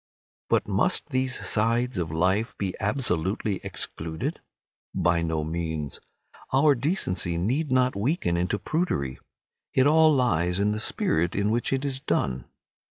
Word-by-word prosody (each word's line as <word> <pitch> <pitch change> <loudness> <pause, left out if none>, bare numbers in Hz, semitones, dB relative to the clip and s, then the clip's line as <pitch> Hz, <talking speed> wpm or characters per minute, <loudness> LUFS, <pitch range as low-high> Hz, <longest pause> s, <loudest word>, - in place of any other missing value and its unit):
But - - +2
must - - +2
these 130 0 -1
sides 115 +1 +1
of 85 -2 -2
life 95 +8 0
be 95 -3 -2
absolutely 100 - -1
excluded? 80 -3 -4 0.6
By 85 -1 +2
no 80 -2 -1
means. 80 -2 -3 0.5
Our 140 +3 +5
decency 115 - -1
need 130 - 0
not 130 0 +3
weaken 100 - 0
into 90 +4 0
prudery. 100 - -2 0.6
It 130 - +5
all 155 +1 +6
lies 90 - +1
in 105 +1 +2
the 105 - -2
spirit 85 -5 0
in 100 +1 +1
which 120 +1 0
it 135 +1 0
is 135 -2 -2
done. 65 - -1
105 Hz, 140 wpm, -26 LUFS, 85-130 Hz, 0.6 s, all